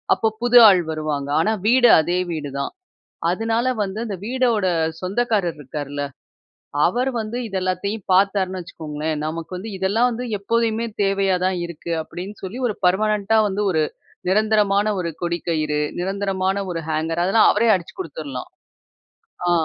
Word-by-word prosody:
அப்போ 220 Hz, -, 0 dB
புது 245 Hz, 0 st, +5 dB
ஆள் 185 Hz, -3 st, +6 dB
வருவாங்க. 150 Hz, -2 st, -3 dB
ஆனா 215 Hz, +6 st, +2 dB, 0.2 s
வீடு 245 Hz, 0 st, +6 dB
அதே 175 Hz, +3 st, 0 dB
வீடுதான். 140 Hz, -3 st, -4 dB, 0.6 s
அதனால 225 Hz, +5 st, 0 dB, 0.2 s
வந்து 195 Hz, +2 st, -4 dB
அந்த 200 Hz, -3 st, -4 dB
வீட்டோட 240 Hz, -5 st, +1 dB, 0.3 s
சொந்தக்காரர் 195 Hz, -3 st, 0 dB
இருக்கார்ல, 145 Hz, +1 st, -5 dB, 0.8 s
அவர் 245 Hz, +8 st, +1 dB
வந்து 220 Hz, +3 st, -5 dB
இது 195 Hz, -, -7 dB
எல்லாத்தையும் 185 Hz, +3 st, -2 dB
பார்த்தார்னு 190 Hz, -1 st, +2 dB
வச்சுக்கோங்களேன், 155 Hz, -2 st, -4 dB
"நமக்கு 165 Hz, +2 st, -5 dB
வந்து 205 Hz, +5 st, -6 dB
இதெல்லாம் 205 Hz, +6 st, +2 dB
வந்து 245 Hz, +1 st, -4 dB
எப்போதுமே 230 Hz, +2 st, 0 dB, 0.2 s
தேவையா 195 Hz, -1 st, +2 dB
தான் 185 Hz, -1 st, +1 dB
இருக்கு" 170 Hz, 0 st, -7 dB
அப்படீன்னு 190 Hz, +6 st, -8 dB
சொல்லி 205 Hz, +7 st, -5 dB
ஒரு 215 Hz, -, -1 dB
பெர்மனன்ட்டா 210 Hz, +3 st, +2 dB
வந்து 200 Hz, +1 st, -2 dB
ஒரு 160 Hz, -2 st, +2 dB, 0.5 s
நிரந்தரமான 210 Hz, 0 st, +3 dB
ஒரு 170 Hz, -2 st, -2 dB
கொடி 170 Hz, 0 st, -1 dB
கயிறு, 155 Hz, -2 st, 0 dB, 0.2 s
நிரந்தரமான 195 Hz, 0 st, -1 dB
ஒரு 170 Hz, -1 st, -2 dB
ஹேங்கர் 160 Hz, +2 st, -1 dB
அதெல்லாம் 205 Hz, +5 st, +5 dB
அவரே 230 Hz, +2 st, +2 dB
அடிச்சு 180 Hz, -2 st, -2 dB
குடுத்தரலாம். 145 Hz, -6 st, -6 dB, 1.0 s
ஆ, -, -, +3 dB
190 Hz, 140 wpm, -22 LUFS, 165-215 Hz, 1.0 s, ஆள்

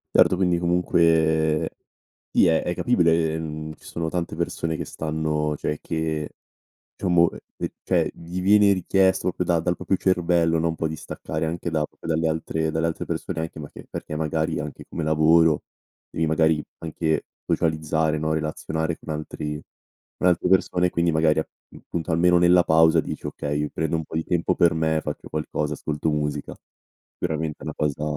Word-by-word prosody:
Certo 95 Hz, -, +6 dB
quindi 90 Hz, -2 st, +2 dB
comunque 80 Hz, -3 st, +2 dB, 0.6 s
sì -, -, +4 dB
è 80 Hz, -, +3 dB
è 90 Hz, -, -2 dB
capibile, 80 Hz, -8 st, +2 dB
mhmm, 80 Hz, -1 st, -5 dB
ci -, -, -23 dB
sono 80 Hz, -1 st, -3 dB
tante 85 Hz, -2 st, -3 dB
persone 80 Hz, -1 st, -2 dB
che -, -, -4 dB
stanno 75 Hz, -1 st, -2 dB
cioè 75 Hz, +1 st, -3 dB
che, 80 Hz, -2 st, -2 dB, 0.7 s
diciamo, 85 Hz, -3 st, +3 dB
uhm, -, -, -9 dB, 0.2 s
ehm, -, -, -2 dB
cioè -, -, +1 dB
gli 85 Hz, +2 st, -6 dB
viene 100 Hz, +1 st, +5 dB
richiesto 95 Hz, +1 st, +2 dB
proprio 90 Hz, 0 st, -1 dB
da 85 Hz, -1 st, +2 dB
dal 90 Hz, +2 st, 0 dB
proprio 95 Hz, -, 0 dB
cervello, 85 Hz, -3 st, +2 dB
no, 85 Hz, +1 st, +1 dB
un 80 Hz, -, -2 dB
po' 80 Hz, -, -1 dB
di 80 Hz, -, -4 dB
staccare 80 Hz, +1 st, -4 dB
anche 85 Hz, +1 st, -3 dB
da 80 Hz, -2 st, 0 dB
proprio -, -, -13 dB
dalle 80 Hz, 0 st, +1 dB
altre 80 Hz, 0 st, -1 dB
dalle 80 Hz, +1 st, 0 dB
altre 80 Hz, -, -3 dB
persone 80 Hz, -, -3 dB
anche 80 Hz, -1 st, -6 dB
ma 75 Hz, -, -7 dB
che -, -, -12 dB
perché 75 Hz, -, -6 dB
magari 80 Hz, +1 st, -1 dB
anche 75 Hz, -2 st, -7 dB
come 85 Hz, -, -4 dB
lavoro 80 Hz, 0 st, +4 dB, 0.5 s
devi 80 Hz, -, -1 dB
magari 80 Hz, -1 st, +2 dB, 0.2 s
anche 80 Hz, -1 st, -1 dB, 0.2 s
socializzare 80 Hz, 0 st, 0 dB
no, 80 Hz, +1 st, -1 dB
relazionare 80 Hz, +1 st, -2 dB
con -, -, -14 dB
antri 75 Hz, -1 st, -5 dB, 0.6 s
con -, -, +2 dB
altre 90 Hz, 0 st, +2 dB
persone 90 Hz, -1 st, +3 dB
e -, -, -3 dB
quindi 85 Hz, -1 st, +1 dB
magari 80 Hz, 0 st, +3 dB
appunto 80 Hz, +1 st, -6 dB
almeno 90 Hz, +2 st, +4 dB
nella 90 Hz, 0 st, +5 dB
pausa 80 Hz, 0 st, +5 dB
dici: -, -, -6 dB
"Okay 75 Hz, 0 st, -2 dB
mi 75 Hz, -, -2 dB
prendo 80 Hz, +1 st, -1 dB
un 80 Hz, -, -3 dB
po' -, -, -8 dB
di 80 Hz, -, 0 dB
tempo 85 Hz, -2 st, +1 dB
per 85 Hz, -2 st, +4 dB
me, 80 Hz, 0 st, +1 dB
faccio -, -, -6 dB
qualcosa, 75 Hz, -1 st, -2 dB
ascolto 75 Hz, +1 st, -2 dB
musica." 75 Hz, -1 st, -2 dB, 0.6 s
Veramente 80 Hz, -2 st, -2 dB
è -, -, -11 dB
una 75 Hz, 0 st, -4 dB
cosa 75 Hz, 0 st, -1 dB
80 Hz, 180 wpm, -24 LUFS, 80-85 Hz, 0.7 s, Certo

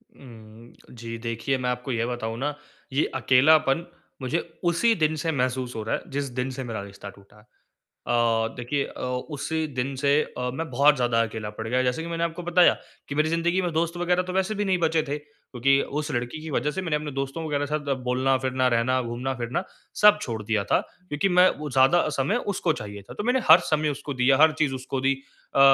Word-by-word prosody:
उम, 115 Hz, -2 st, -14 dB, 0.2 s
जी 115 Hz, -1 st, -7 dB
देखिए, 115 Hz, +4 st, -1 dB
मैं 125 Hz, -1 st, -2 dB
आपको 125 Hz, +1 st, -3 dB
ये 115 Hz, -1 st, 0 dB
बताऊँ 115 Hz, -2 st, -4 dB
ना 145 Hz, +2 st, -2 dB, 0.4 s
ये 145 Hz, -, +2 dB
अकेलापन 140 Hz, +4 st, +4 dB, 0.4 s
मुझे 130 Hz, +6 st, 0 dB, 0.3 s
उसी 225 Hz, +7 st, +3 dB
दिन 155 Hz, -3 st, +1 dB
से 165 Hz, -, +2 dB
महसूस 125 Hz, -2 st, -1 dB
हो 110 Hz, -, -3 dB
रहा 110 Hz, -, -1 dB
है -, -, -5 dB
जिस 140 Hz, -1 st, -2 dB
दिन 130 Hz, +1 st, -1 dB
से -, -, -2 dB
मेरा 115 Hz, -4 st, -4 dB
रिश्ता 100 Hz, 0 st, -10 dB
टूटा 100 Hz, +1 st, -18 dB
है। 105 Hz, -, -20 dB, 0.6 s
अ, -, -, +1 dB, 0.4 s
देखिए 125 Hz, +4 st, -1 dB
अ, -, -, -10 dB, 0.4 s
उसी 160 Hz, +2 st, -2 dB
दिन 135 Hz, 0 st, -3 dB
से 140 Hz, +1 st, +1 dB
अ, 125 Hz, 0 st, -5 dB
मैं 160 Hz, +4 st, -4 dB
बहुत 140 Hz, +4 st, +5 dB
ज़्यादा 120 Hz, -3 st, +2 dB
अकेला 110 Hz, -1 st, -5 dB
पड़ 110 Hz, +1 st, -7 dB
गया, 125 Hz, +2 st, +1 dB
जैसे 125 Hz, +5 st, 0 dB
कि -, -, -6 dB
मैंने 170 Hz, 0 st, -2 dB
आपको 170 Hz, +1 st, -3 dB
बताया 175 Hz, +1 st, +5 dB, 0.4 s
कि 140 Hz, -, -4 dB
मेरी 155 Hz, +1 st, +2 dB
ज़िन्दगी 170 Hz, +3 st, +1 dB
में 175 Hz, -, -1 dB
दोस्त 170 Hz, +2 st, 0 dB
वगैरह 180 Hz, +1 st, +1 dB
तो 180 Hz, -, -6 dB
वैसे 190 Hz, +3 st, 0 dB
भी 205 Hz, -, -1 dB
नहीं 190 Hz, -2 st, +2 dB
बचे 160 Hz, -1 st, +2 dB
थे, 145 Hz, 0 st, -3 dB
क्योंकि 135 Hz, -2 st, 0 dB, 0.2 s
उस 150 Hz, -, -4 dB
लड़की 120 Hz, +5 st, -3 dB
की 160 Hz, -, -7 dB
वजह 150 Hz, +2 st, 0 dB
से 190 Hz, -, -3 dB
मैंने 165 Hz, -4 st, -1 dB
अपने 150 Hz, -1 st, -3 dB
दोस्तों 135 Hz, +4 st, -4 dB
वगैरह 145 Hz, -1 st, -1 dB
के -, -, -9 dB
साथ 145 Hz, -2 st, -2 dB, 0.2 s
बोलना-फ़िरना, 130 Hz, 0 st, +1 dB
रहना, 125 Hz, +2 st, +2 dB
घूमना-फ़िरना 120 Hz, +3 st, -3 dB, 0.4 s
सब 210 Hz, 0 st, +8 dB
छोड़ 115 Hz, -3 st, -4 dB
दिया 105 Hz, -1 st, 0 dB
था। -, -, +5 dB, 0.3 s
क्योंकि 150 Hz, +7 st, 0 dB
मैं 180 Hz, +1 st, +6 dB
वो 150 Hz, -1 st, -5 dB
ज़्यादा 135 Hz, +7 st, +4 dB
समय 195 Hz, -, +1 dB, 0.2 s
उसको 165 Hz, -5 st, +1 dB
चाहिए 105 Hz, -1 st, -8 dB
था। -, -, -11 dB
तो 205 Hz, -, -5 dB
मैंने 250 Hz, +2 st, +2 dB
हर 165 Hz, -, +10 dB
समय 155 Hz, 0 st, +2 dB
उसको 145 Hz, 0 st, -5 dB
दिया, 130 Hz, +1 st, +3 dB
हर 155 Hz, +1 st, +6 dB
चीज़ 135 Hz, -3 st, -1 dB
उसको 130 Hz, 0 st, -4 dB
दी 135 Hz, +1 st, +2 dB, 0.4 s
अ, -, -, +3 dB
135 Hz, 215 wpm, -25 LUFS, 125-160 Hz, 0.6 s, हर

